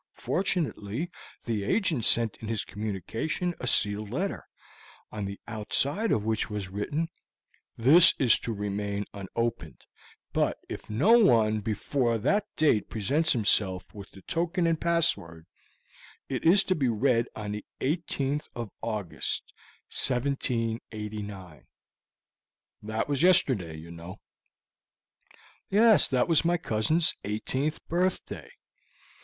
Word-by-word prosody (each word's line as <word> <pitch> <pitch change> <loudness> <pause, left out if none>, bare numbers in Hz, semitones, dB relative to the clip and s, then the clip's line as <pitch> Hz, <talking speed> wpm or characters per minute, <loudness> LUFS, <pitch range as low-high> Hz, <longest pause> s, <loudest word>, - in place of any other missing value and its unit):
Fortunately, 165 - -2 0.3
the 110 -4 -1
agent 155 - +1
sent 115 -3 +3
in 110 - -8
his 110 -2 -2
communication 110 - -3
a 125 - -4
sealed 105 -2 +2
letter, 185 - -3 0.6
on 105 -2 -4
the 100 0 -6
outside 135 - 0
of 105 - +1
which 110 -1 0
was 105 -3 -4
written, 145 - -2 0.7
'This 160 +10 +7
is 125 -5 +4
to 115 - -4
remain 100 -1 -3
unopened, 105 -2 -4 0.5
but - - +1
if - - -8
no 190 - +5
one 110 - +4
before 115 +3 0
that 205 - +1
date 145 -9 +2
presents 140 +9 +1
himself 95 -5 +1
with 100 -1 -10
the 95 - -15
token 170 +2 -1
and 165 -1 +1
password, 100 - 0 0.8
it - - -3
is 190 +4 +6
to 185 - +1
be 140 -7 0
read 120 +1 +2
on 105 -1 -5
the 105 0 -5 0.2
18th 145 -1 -1
of 120 -4 -5
August, 105 -6 -3 0.4
1789.' 110 - -2 1.1
That 110 +1 -2
was 145 -1 -1
yesterday, 125 - +3
you 80 +2 -10
know." 85 +3 -9 1.5
"Yes, 215 +1 +5
that 125 -2 +1
was 165 -2 +3
my 175 +1 +2
cousin's 155 +6 +1
eighteenth 130 +8 -2
birthday. 180 +3 -2
115 Hz, 120 wpm, -28 LUFS, 105-155 Hz, 1.5 s, This